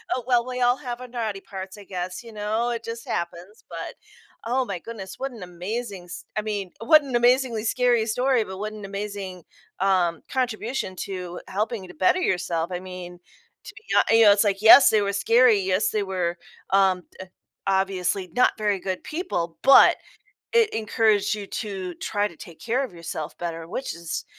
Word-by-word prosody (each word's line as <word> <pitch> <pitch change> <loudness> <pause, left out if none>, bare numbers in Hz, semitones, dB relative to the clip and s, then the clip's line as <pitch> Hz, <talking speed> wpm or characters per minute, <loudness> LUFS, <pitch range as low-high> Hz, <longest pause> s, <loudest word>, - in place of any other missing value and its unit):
Oh, 250 - -4
well, 240 -2 +3
we 250 0 -4
all 245 +1 +4
have 245 -3 -6
our 250 - -7
naughty 225 -5 -4
parts, 190 0 -8
I 205 - -11
guess, 185 +1 -5
you 230 -1 -12
know? 215 +3 -1
It 230 -1 -4
just 230 0 -7
happens, 175 +5 -5
but - - -6 0.5
oh, 255 +3 +1
my 195 -6 -4
goodness 195 -1 -8
what 270 +1 -4
an 225 -6 -9
amazing 190 +2 -5
s 175 - -9
I - - +2
mean, 205 -3 -4
what 305 +6 +6
an 265 -3 -4
amazingly 240 -2 +3
scary 240 -1 +2
story, 250 +2 +1
but 190 -2 -8
what 215 +1 -4
an 210 -1 -9
amazing, 195 -2 -6 0.4
um, 180 -3 +2
contribution 245 -5 -2
to 180 -2 -5
helping 210 +2 -2
you 185 - -11
to 180 - -12
better 185 - +3
yourself. 175 - -1
I 180 - -3
mean, 180 -1 -9 0.5
to - - -9
be - - -13
not - - +5
you 225 0 +6
know, 205 - +9
it's 200 - +3
like, 200 -2 0
yes, 235 +5 +9
they 215 - +3
were 200 0 -1
scary. 230 +2 +4
Yes, 190 +3 +1
they 210 -1 0
were, 180 -2 -2 0.3
um, 190 -2 +3 0.2
d 190 - -8 0.4
obviously 190 -1 0
not 250 - +5
very 210 -2 +1
good 185 0 -4
people, 175 - -3
but 275 - +8 0.6
it 460 -2 +5
encouraged 215 -2 +2
you 205 -2 -6
to 195 -5 -5
try 205 0 -1
to 170 - -16
take 165 0 -12
care 240 +4 0
of 240 - -9
yourself 165 -2 -6
better, 165 -1 -5
which 260 0 -4
is 170 -1 -5
205 Hz, 195 wpm, -24 LUFS, 185-235 Hz, 0.6 s, know